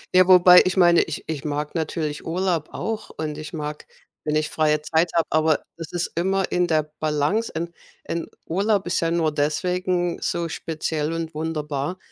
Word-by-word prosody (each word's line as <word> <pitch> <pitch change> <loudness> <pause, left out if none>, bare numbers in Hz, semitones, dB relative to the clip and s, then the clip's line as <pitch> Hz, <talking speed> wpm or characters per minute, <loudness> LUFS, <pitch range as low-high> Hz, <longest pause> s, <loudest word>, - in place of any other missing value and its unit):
Ja, 185 0 +7
wobei 180 -1 +9
ich 185 +1 -1
meine, 175 -2 +6
ich 160 - -4
ich 155 -3 -4
mag 150 0 -3
natürlich 155 -2 -3
Urlaub 170 -2 -1
auch 220 -1 -4
und 155 -1 -3
ich 155 -1 -7
mag, 150 -1 -6 0.4
wenn 150 0 -1
ich 155 0 +1
freie 150 -1 +2
Zeit 160 +2 +2
habe, 165 - +3
aber 155 -1 +2
es 165 - -7
ist 175 -1 -2
immer 190 +2 0
in 180 0 +2
der 155 -2 +2 0.2
Balance. 155 +9 0
Ein 170 +1 -3 0.3
ein 170 0 -3 0.2
Urlaub 195 +3 +1
ist 175 - 0
ja 165 - +1
nur 165 -2 +1
deswegen 175 +4 0
so 170 -1 -1
speziell 160 -1 -3
und 165 0 -4
wunderbar, 150 0 -3
165 Hz, 180 wpm, -23 LUFS, 155-180 Hz, 0.4 s, wobei